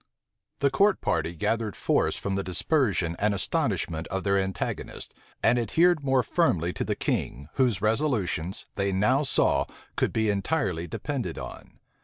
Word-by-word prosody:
The 140 -1 +3
court 200 +7 +3
party 85 - -1
gathered 110 +4 -1
force - - +1
from 100 - -3
the 95 0 -1
dispersion 95 - +1
and 105 0 +2
astonishment 80 -3 -1
of 95 0 -3
their 100 -1 +2
antagonists, 95 -2 -3 0.3
and 120 - +4
adhered 160 - +3
more 135 -2 +3
firmly 90 - +1
to - - -2
the - - -1
king, 70 +4 -2
whose 120 -7 +1
resolutions, 105 - 0
they 100 0 0
now 105 +9 +3
saw, 140 - +2 0.3
could - - +1
be 110 -1 +1
entirely 100 - -1
depended 120 - -4
on. 65 -2 -9
100 Hz, 150 wpm, -27 LUFS, 90-135 Hz, 0.3 s, and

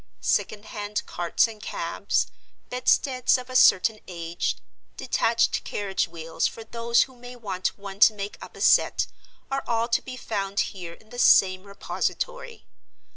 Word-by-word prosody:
Second 215 0 0
hand 210 -1 -4
carts 175 +6 +1
and 220 -2 -11
cabs, - - -1 0.5
bedsteads 255 0 +2
of 255 0 -9
a - - -7
certain 215 -2 +5
age, 170 -1 -3 0.4
detached 230 0 +1
carriage 200 -2 -2
wheels 165 -1 -2
for 225 - -8
those 235 +1 +2
who 260 - -13
may 245 0 -11
want 195 -6 -3
one 200 -1 -9
to 215 0 +7
make 200 0 -5
up - - -11
a - - -10
set, - - +4 0.5
are 275 0 -1
all 230 0 +1
to 235 - +2
be 255 -1 -8
found 200 -4 -1
here 175 -4 -8
in 215 +5 -20
the 245 - -7
same 185 -4 +5
repository. 485 - -4
215 Hz, 155 wpm, -25 LUFS, 195-245 Hz, 0.5 s, to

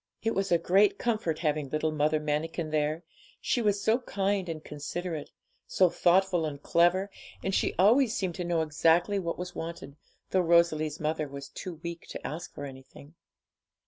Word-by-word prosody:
It 225 - +1
was 195 -1 -1
a 170 - +6
great 195 +4 +3
comfort 215 -9 -1
having 150 -2 0
little 155 +2 0
Mother 155 0 +1
Manikin 155 +2 -2
there, 155 +2 0 0.4
she 245 - 0
was 205 -2 +1
so 225 +3 +3
kind 195 -5 -1
and 160 -1 -5
considerate, 155 +2 -5 0.4
so 185 -3 +3
thoughtful 180 -1 +3
and 150 -2 -3
clever, 175 +6 +2 0.3
and 195 - -1
she - - +1
always 235 +5 +4
seemed 185 -3 -1
to - - -1
know 170 -1 0
exactly 165 +6 +2
what 170 -3 -3
was 180 0 -6
wanted, 165 -4 -7 0.3
though 190 - +3
Rosalie's 165 -3 +3
mother 155 -1 -1
was 140 0 -8
too 180 +4 -7
weak 170 0 -6
to - - -8
ask 160 +3 -5
for 145 - -7
anything. 135 +2 -12
170 Hz, 175 wpm, -29 LUFS, 155-190 Hz, 0.4 s, a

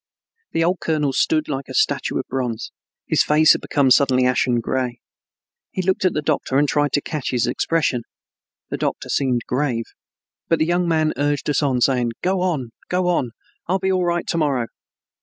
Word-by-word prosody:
The 165 - +2
old 180 +2 +1
colonel 150 -4 0
stood 155 +3 +1
like 135 -2 -4
a - - -6
statue - - +1
of - - -2
bronze. 125 -4 -3 0.3
His - - +2
face 155 +1 +5
had - - +2
become 140 -3 +1
suddenly 130 -2 +4
ashen 125 -1 +2
gray. 125 0 -2 0.7
He 185 - -3
looked 190 +1 0
at 185 - +3
the 150 - -2
doctor 145 -3 0
and 145 +1 +3
tried 145 +1 +1
to 145 - +2
catch 155 -5 -3
his 125 -2 +1
expression. 135 0 0 0.7
The - - -1
doctor - - -3
seemed 125 -4 0
grave. 125 -3 -1 0.6
But 165 - +3
the 155 - +1
young 175 +1 +1
man 160 -2 +2
urged 145 0 0
us 145 - +1
on, 130 -4 +1
saying, 125 -3 +2
"Go 185 0 +1
on, 150 -10 -1 0.2
go 180 0 +1
on, 130 -9 0 0.3
I'll 185 +3 +2
be 190 0 0
all 185 -1 +1
right 175 0 0
to 170 - -2
morrow." 140 -6 +1
145 Hz, 195 wpm, -21 LUFS, 125-165 Hz, 0.7 s, face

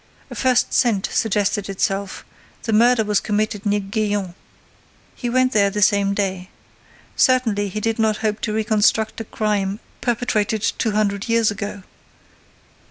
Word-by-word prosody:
A - - -7
first 255 -2 +1
scent 220 -6 +2
suggested 205 -2 0
itself: 195 0 -2 0.4
the 225 - -2
murder 235 +1 +4
was 210 -1 +1
committed 210 0 -2
near 205 0 +2
Gaillon. 205 -2 -2 0.8
He 245 - -4
went 255 +1 +2
there 200 -3 +3
that 210 +1 -3
same 200 0 +2
day. 190 -2 -2 0.7
Certainly, 225 -6 +2
he 215 - -4
did 225 +1 -1
not 220 -1 +2
hope 210 0 -1
to 215 - -2
reconstruct 220 +1 +1
a - - -6
crime 210 -2 -1 0.2
perpetrated 220 -3 0 0.2
two 225 - +1
hundred 205 +1 -1
years 230 -2 +3
ago. 205 -1 -6
210 Hz, 145 wpm, -21 LUFS, 200-225 Hz, 0.8 s, murder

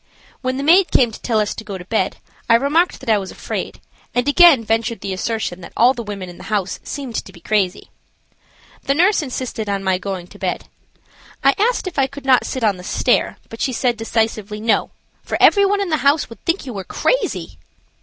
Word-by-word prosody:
When 255 0 -2
the 275 - -3
maid 355 +5 +5
came 240 -3 +3
to - - -11
tell 225 -3 +1
us 210 -1 0
to 220 - -8
go 200 -3 -6
to 180 - -10
bed 190 -2 -1 0.3
I 230 - +7
remarked 295 +8 +2
that - - -6
I 210 - +4
was 190 -1 -6
afraid, - - -5 0.4
and 245 +1 +1
again 290 -4 +7
ventured 225 0 -1
the 195 -1 -3
assertion 185 -2 -3
that 170 - -11
all 245 +3 +5
the 240 - -5
women 205 -4 -6
in 175 - -11
the - - -10
house 200 -3 -1
seemed 275 -4 -6
to - - -13
be 175 - -15
crazy. 200 -1 -1 0.9
The 275 - 0
nurse 370 +5 +4
insisted 255 -6 -4
on 200 -1 -1
my 190 -1 +1
going 190 -3 -5
to - - -16
bed. - - -3 0.8
I 275 - +5
asked 470 +2 +1
if 355 -6 -3
I 270 - +3
could 280 0 -11
not 260 -2 +4
sit 260 - -4
on 205 -4 +2
the 180 - -10
stairs, - - +1
but 225 - -9
she 260 - 0
said, 245 0 +1
decisively: 220 -2 -2
"No; 225 +1 +1 0.3
for - - -3
every 400 -1 +6
one 405 0 +1
in 390 - -2
the 310 - +2
house 280 -1 +2
would 230 - -13
think 335 0 0
you 250 - -6
were 195 -2 -5
crazy." - - -1
230 Hz, 225 wpm, -19 LUFS, 205-280 Hz, 0.9 s, I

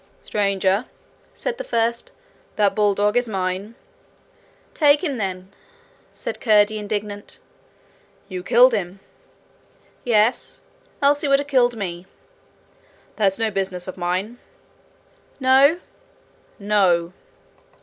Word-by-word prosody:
'Stranger,' 200 +1 0 0.5
said 480 -1 -4
the - - -3
first, 235 - -1 0.4
'that 205 -2 +2
bulldog 205 0 +1
is 245 -1 +1
mine.' 190 +2 -3 1.0
'Take 295 0 +4
him, 285 -7 -2
then,' 190 -2 -4 0.6
said - - -7
Curdie, 215 -1 +3
indignant. 205 0 -5 0.9
'You've 185 -2 -7
killed 245 +1 +6
him!' 190 -2 -3 1.0
'Yes 225 0 +1 0.4
else 290 +1 +3
he 295 - -1
would 275 0 +4
have 285 0 -4
killed 245 -4 +2
me.' 180 -3 -5 1.1
'That's 195 -3 +1
no 225 -1 0
business 190 -2 -3
of 185 - -6
mine.' 185 +7 -3 1.0
'No?' 270 +5 +5 0.8
'No.' 190 -5 +1
210 Hz, 105 wpm, -21 LUFS, 190-245 Hz, 1.1 s, killed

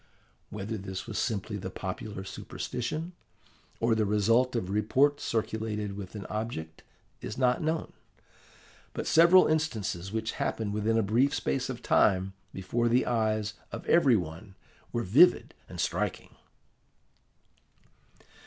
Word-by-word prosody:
Whether 105 +1 -5
this 95 -1 -6
was - - -4
simply 105 -2 -2
the 95 -1 -5
popular 95 +2 -6
superstition, 155 - -5 0.7
or 115 0 +2
the 110 -1 +2
result 115 +5 +2
of 95 -5 -2
reports 135 +8 +2
circulated 110 -2 -2
with 100 0 -8
an 100 -3 -6
object, 100 -8 -5 0.4
is 105 - -6
not 125 -1 +2
known. 160 +1 -2 1.0
But - - -4
several 170 +3 +7
instances 110 - -1
which 110 0 -2
happened 105 -2 -1
within 110 +2 +1
a 115 - +3
brief 120 +8 +2
space 130 -1 -1
of 125 -2 -6
time 95 -1 +3 0.2
before 115 +6 -1
the 125 +2 +3
eyes 110 -2 0 0.2
of - - -7
every 140 -8 +5
one 90 +1 -5 0.4
were 120 - -1
vivid 150 - +5 0.2
and - - -9
striking. - - -2
110 Hz, 130 wpm, -29 LUFS, 100-125 Hz, 1.0 s, several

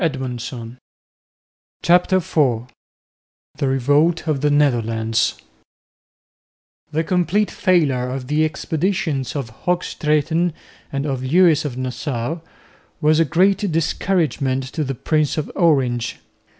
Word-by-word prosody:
CHAPTER 180 +2 +4
IV 145 -10 +1 0.9
THE 145 -2 0
REVOLT 145 +6 +2
OF 150 -4 0
THE 150 - +2
NETHERLANDS 115 -6 +1 1.5
The 160 +2 0
complete 180 +4 +1
failure 145 -10 +1
of 130 0 -4
the 150 +4 +1
expeditions 155 -2 -1
of 135 -6 -4
Hoogstraeten 165 -1 0 0.4
and 140 +1 -2
of 135 -3 -2
Lewis 160 +2 +4
of 130 -4 -4
Nassau 130 +3 -3 0.6
was 155 0 +3
a 165 - +4
great 190 +5 +2
discouragement 155 -5 0
to 155 - -1
the 135 -1 -3
Prince 155 +4 0
of 155 - -3
Orange. 130 -8 +1
150 Hz, 105 wpm, -20 LUFS, 130-170 Hz, 1.5 s, CHAPTER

